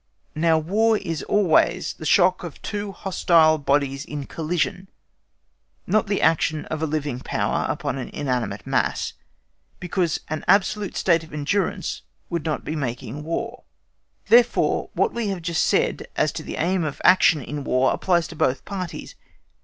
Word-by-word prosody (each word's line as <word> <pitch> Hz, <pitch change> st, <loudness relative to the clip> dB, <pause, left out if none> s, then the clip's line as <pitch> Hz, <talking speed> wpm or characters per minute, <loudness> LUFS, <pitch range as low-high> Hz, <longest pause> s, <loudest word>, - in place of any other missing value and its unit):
Now 160 Hz, +1 st, +3 dB
War 215 Hz, +8 st, +2 dB
is 165 Hz, -6 st, -4 dB
always 200 Hz, -6 st, +2 dB
the 155 Hz, -, -6 dB
shock 185 Hz, +3 st, +4 dB
of 170 Hz, -4 st, -8 dB
two 205 Hz, -1 st, -4 dB
hostile 165 Hz, -4 st, +3 dB
bodies 140 Hz, -1 st, 0 dB
in 145 Hz, -2 st, -6 dB
collision, 170 Hz, +4 st, -2 dB, 1.0 s
not 215 Hz, +4 st, +1 dB
the 200 Hz, 0 st, 0 dB
action 155 Hz, -1 st, +2 dB
of 155 Hz, 0 st, -4 dB
a 160 Hz, -, 0 dB
living 145 Hz, -4 st, -2 dB
power -, -, -1 dB
upon 135 Hz, -, -2 dB
an 125 Hz, -, -5 dB
inanimate 125 Hz, -6 st, -3 dB
mass, -, -, 0 dB, 0.7 s
because 180 Hz, -2 st, -1 dB
an 155 Hz, -1 st, -4 dB
absolute 200 Hz, +1 st, +2 dB
state 170 Hz, -3 st, +2 dB
of 160 Hz, -, -14 dB
endurance 150 Hz, +7 st, -2 dB, 0.3 s
would 170 Hz, -2 st, -2 dB
not 155 Hz, -2 st, -2 dB
be 155 Hz, -, -3 dB
making 135 Hz, +1 st, -4 dB
War; 230 Hz, +10 st, -4 dB, 0.6 s
therefore, 240 Hz, +1 st, +3 dB
what -, -, +1 dB
we 235 Hz, -2 st, -2 dB
have 190 Hz, -4 st, -3 dB
just 170 Hz, -1 st, +1 dB
said -, -, +1 dB
as -, -, +1 dB
to -, -, -6 dB
the -, -, -6 dB
aim 180 Hz, +1 st, 0 dB
of 150 Hz, -3 st, -4 dB
action 185 Hz, -4 st, +6 dB
in 145 Hz, +2 st, -6 dB
War 130 Hz, 0 st, +2 dB
applies 175 Hz, -3 st, +1 dB
to 170 Hz, -, -9 dB
both 130 Hz, -3 st, 0 dB
parties. 185 Hz, -4 st, -6 dB
165 Hz, 160 wpm, -23 LUFS, 150-190 Hz, 1.0 s, action